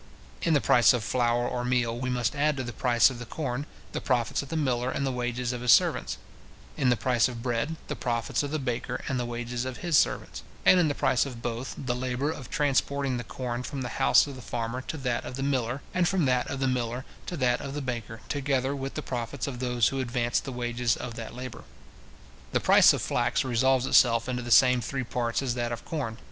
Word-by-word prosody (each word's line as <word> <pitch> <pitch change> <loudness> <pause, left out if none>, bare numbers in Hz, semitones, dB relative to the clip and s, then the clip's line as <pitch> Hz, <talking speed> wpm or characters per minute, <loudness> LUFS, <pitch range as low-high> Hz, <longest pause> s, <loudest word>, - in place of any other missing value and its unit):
In 165 -5 +2
the 145 - +3
price 120 0 +5
of 120 -3 -1
flour 120 +1 +1
or 125 -1 -2
meal, 125 -2 +1
we 130 +1 -3
must 125 +1 0
add 150 0 +1
to 130 - -2
the 120 -1 -6
price 120 0 +4
of 120 - -8
the 120 - -6
corn, 135 0 -3 0.2
the - - -4
profits 120 -3 0
of 140 - -10
the 165 - -2
miller, 125 -4 0
and 140 - -2
the 135 - 0
wages 125 0 -2
of 125 - -5
his 125 -1 +4
servants; 65 - +3 0.6
in 130 - +2
the 120 - +3
price 120 +2 +2
of 120 -2 -7
bread, 125 +6 -1
the - - -3
profits 115 -4 -1
of 145 - -3
the 155 - -1
baker, 125 -5 -3
and 130 -3 -1
the 120 - -2
wages 120 0 -3
of 130 -1 -5
his 170 -3 +2
servants; - - -1 0.2
and 185 - +7
in 170 - +4
the 145 - -1
price 130 - +2
of 120 -3 -9
both, 120 +2 -4
the 125 -2 -2
labour 130 +3 -1
of 135 -6 -8
transporting 140 -2 0
the 120 - -4
corn 120 0 -4
from 135 +1 -5
the 120 - -5
house - - +6
of 140 -2 -8
the 130 - -9
farmer 120 +2 -3
to 160 - -6
that 125 -4 -1
of 125 - -6
the 135 - -3
miller, 130 -1 -1
and 180 -1 +2
from 185 -5 +1
that 125 -1 +1
of 140 - -4
the 135 - +1
miller 125 0 -2 0.2
to 175 - -4
that 125 -3 +1
of 140 0 -6
the - - -2
baker, 115 -4 -5
together 140 -1 0
with 135 0 -5
the - - -3
profits 120 +1 -4
of 130 -4 -5
those 125 -3 +2
who 135 - -3
advance 120 -1 0
the 135 - -7
wages 120 -1 -1
of 120 - -6
that 115 0 -7
labour. 125 -1 -7 0.9
The - - +3
price - - +7
of - - -1
flax - - +1
resolves 130 +1 +2
itself 115 -3 +4
into 125 -1 -2
the 120 - -6
same 125 +1 +6
three 135 +3 -3
parts 120 +1 -1
as 125 -3 0
that 120 -1 -2
of 120 - -5
corn. 130 -9 -3
125 Hz, 240 wpm, -27 LUFS, 120-135 Hz, 0.9 s, and